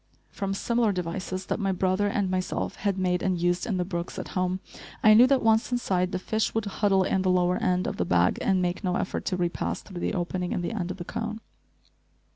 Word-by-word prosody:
From 195 Hz, 0 st, -3 dB
similar 235 Hz, +1 st, +1 dB
devices 185 Hz, +1 st, -4 dB
that -, -, -2 dB
my 195 Hz, -2 st, +1 dB
brother 185 Hz, +2 st, +1 dB
and 200 Hz, -1 st, 0 dB
myself 185 Hz, 0 st, -2 dB
had 200 Hz, -2 st, -1 dB
made 180 Hz, -1 st, +1 dB
and 185 Hz, -2 st, 0 dB
used 175 Hz, +1 st, 0 dB
in 205 Hz, -5 st, 0 dB
the 180 Hz, -, 0 dB
brooks 175 Hz, -2 st, -4 dB
at -, -, -5 dB
home, 185 Hz, 0 st, -1 dB, 0.4 s
I 215 Hz, -, +8 dB
knew 240 Hz, +4 st, +8 dB
that, 270 Hz, 0 st, +2 dB
once 220 Hz, +2 st, +3 dB
inside, 185 Hz, -7 st, 0 dB
the -, -, -1 dB
fish 220 Hz, +5 st, -1 dB
would 225 Hz, -1 st, 0 dB
huddle 200 Hz, -1 st, +2 dB
in 190 Hz, -, +1 dB
the 185 Hz, -, +1 dB
lower 180 Hz, 0 st, +3 dB
end 180 Hz, 0 st, +1 dB
of -, -, -3 dB
the -, -, +1 dB
bag 90 Hz, 0 st, +2 dB
and 190 Hz, -2 st, +2 dB
make 175 Hz, 0 st, -2 dB
no 180 Hz, -2 st, 0 dB
effort 185 Hz, -, -2 dB
to 185 Hz, -, -1 dB
repass 175 Hz, -1 st, -2 dB
through 185 Hz, -3 st, -8 dB
the -, -, -1 dB
opening 180 Hz, 0 st, -2 dB
in -, -, -1 dB
the 175 Hz, -, -2 dB
end 185 Hz, -5 st, -3 dB
of 185 Hz, -, -5 dB
the 175 Hz, -, -7 dB
cone. 220 Hz, +2 st, -4 dB
185 Hz, 235 wpm, -27 LUFS, 180-205 Hz, 0.4 s, I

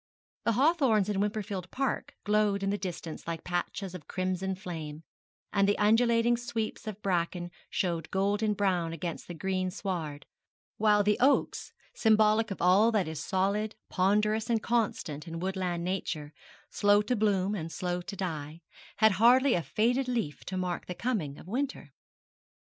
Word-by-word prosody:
The 230 Hz, -, +3 dB
hawthorns 260 Hz, -, +3 dB
in 200 Hz, -2 st, 0 dB
Wimperfield 205 Hz, -3 st, -2 dB
Park 270 Hz, -1 st, -2 dB
glowed 210 Hz, -1 st, +2 dB
in 195 Hz, -, +1 dB
the 205 Hz, -, 0 dB
distance 175 Hz, -4 st, -6 dB
like 165 Hz, -1 st, -4 dB
patches 180 Hz, +2 st, -3 dB
of 180 Hz, -5 st, -9 dB
crimson 185 Hz, 0 st, -2 dB
flame, 160 Hz, -5 st, -7 dB, 0.5 s
and 200 Hz, 0 st, +3 dB
the 205 Hz, -, +2 dB
undulating 230 Hz, +2 st, +4 dB
sweeps 225 Hz, -2 st, -4 dB
of 215 Hz, -1 st, -5 dB
bracken 175 Hz, -1 st, -1 dB, 0.2 s
showed 170 Hz, -4 st, -1 dB
golden 205 Hz, +2 st, +1 dB
brown 180 Hz, -5 st, 0 dB
against 165 Hz, 0 st, -5 dB
the 175 Hz, -, -7 dB
green 185 Hz, +2 st, -1 dB
sward; 170 Hz, -7 st, -4 dB, 0.5 s
while 210 Hz, -1 st, +4 dB
the 210 Hz, +1 st, +2 dB
oaks 275 Hz, +3 st, +2 dB, 0.2 s
symbolic 220 Hz, 0 st, +4 dB
of 195 Hz, -, -4 dB
all 195 Hz, +6 st, +5 dB
that 210 Hz, -6 st, +1 dB
is 160 Hz, -1 st, -5 dB
solid, 200 Hz, +3 st, 0 dB
ponderous, 210 Hz, +4 st, +2 dB
and 225 Hz, -2 st, +1 dB
constant 195 Hz, -10 st, -1 dB
in 165 Hz, 0 st, -5 dB
woodland 185 Hz, -2 st, -2 dB
nature, 165 Hz, -5 st, -3 dB, 0.4 s
slow 205 Hz, 0 st, +4 dB
to 250 Hz, +4 st, 0 dB
bloom 205 Hz, -2 st, +1 dB
and 165 Hz, -5 st, -4 dB
slow 180 Hz, 0 st, -2 dB
to 195 Hz, +3 st, -7 dB
die 160 Hz, -4 st, -4 dB, 0.4 s
had 220 Hz, 0 st, +6 dB
hardly 255 Hz, +3 st, +6 dB
a 175 Hz, -, +1 dB
faded 245 Hz, +9 st, +1 dB
leaf 230 Hz, -12 st, -2 dB
to 185 Hz, -, -4 dB
mark 180 Hz, -1 st, -3 dB
the 180 Hz, -, -5 dB
coming 180 Hz, -, -2 dB
of -, -, -13 dB
winter. 265 Hz, +7 st, -3 dB
195 Hz, 160 wpm, -29 LUFS, 175-215 Hz, 0.5 s, had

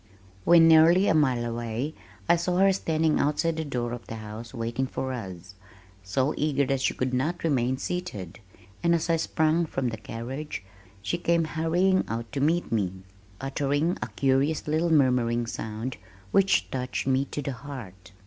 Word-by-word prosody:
When 170 Hz, -1 st, +7 dB
nearly 165 Hz, +4 st, +6 dB
a -, -, +4 dB
mile 130 Hz, -6 st, +2 dB
away 120 Hz, +5 st, -3 dB, 0.3 s
I -, -, +6 dB
saw 175 Hz, +1 st, -1 dB
her 195 Hz, +1 st, +5 dB
standing 160 Hz, -3 st, +1 dB
outside 160 Hz, +3 st, +1 dB
the 160 Hz, -, -1 dB
door 125 Hz, -5 st, -3 dB
of 120 Hz, -, -8 dB
the 115 Hz, -, -6 dB
house 110 Hz, +1 st, -8 dB
waiting 120 Hz, +1 st, -2 dB
for 130 Hz, 0 st, -3 dB
us, 95 Hz, -6 st, -7 dB, 0.5 s
so 130 Hz, +10 st, 0 dB
eager 145 Hz, -2 st, +1 dB
that 135 Hz, 0 st, 0 dB
she -, -, +1 dB
could 130 Hz, 0 st, -1 dB
not 155 Hz, +8 st, -1 dB
remain 130 Hz, -5 st, +1 dB
seated, 120 Hz, -, -5 dB, 0.4 s
and 170 Hz, 0 st, +3 dB
as 165 Hz, +1 st, 0 dB
I 165 Hz, -, +3 dB
sprang 160 Hz, +1 st, +1 dB
from 135 Hz, -4 st, -1 dB
the 110 Hz, -, -5 dB
carriage 120 Hz, +4 st, -6 dB, 0.4 s
she 100 Hz, -, -1 dB
came 170 Hz, -1 st, +2 dB
hurrying 170 Hz, +4 st, +1 dB
out 115 Hz, 0 st, -4 dB
to 140 Hz, -, -3 dB
meet 165 Hz, +4 st, +1 dB
me, 95 Hz, -4 st, -1 dB, 0.4 s
uttering 145 Hz, +5 st, 0 dB
a -, -, -2 dB
curious 140 Hz, +4 st, +1 dB
little 160 Hz, +3 st, +1 dB
murmuring 125 Hz, -5 st, +3 dB
sound 110 Hz, +2 st, -5 dB, 0.3 s
which 195 Hz, 0 st, +3 dB
touched 130 Hz, -1 st, -3 dB
me 135 Hz, +1 st, +2 dB
to 145 Hz, -, -5 dB
the 140 Hz, -, -2 dB
heart. 120 Hz, -9 st, -9 dB
135 Hz, 170 wpm, -27 LUFS, 120-160 Hz, 0.5 s, When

